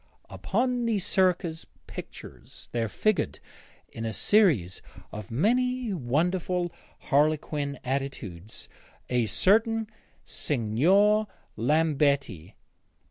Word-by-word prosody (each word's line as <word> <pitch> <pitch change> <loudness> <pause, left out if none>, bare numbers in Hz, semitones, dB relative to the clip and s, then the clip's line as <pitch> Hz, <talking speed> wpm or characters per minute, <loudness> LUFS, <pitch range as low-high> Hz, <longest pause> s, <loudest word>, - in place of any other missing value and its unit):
Upon 245 -1 -1
these 210 -5 0
circus 180 -3 +1 0.2
pictures - - -10
there 115 -2 -1
figured, 190 - 0 0.5
in 115 - -8
a 110 -1 -2
series 145 - +2 0.3
of 105 -2 -8
many 245 - +1
wonderful 175 +5 0 0.3
harlequin 145 -1 0
attitudes, 125 -8 -5 0.4
a 120 -2 +2
certain 220 - +2 0.4
Signor 180 - +2 0.3
Lambetti. 140 - +1
155 Hz, 80 wpm, -27 LUFS, -, 0.5 s, series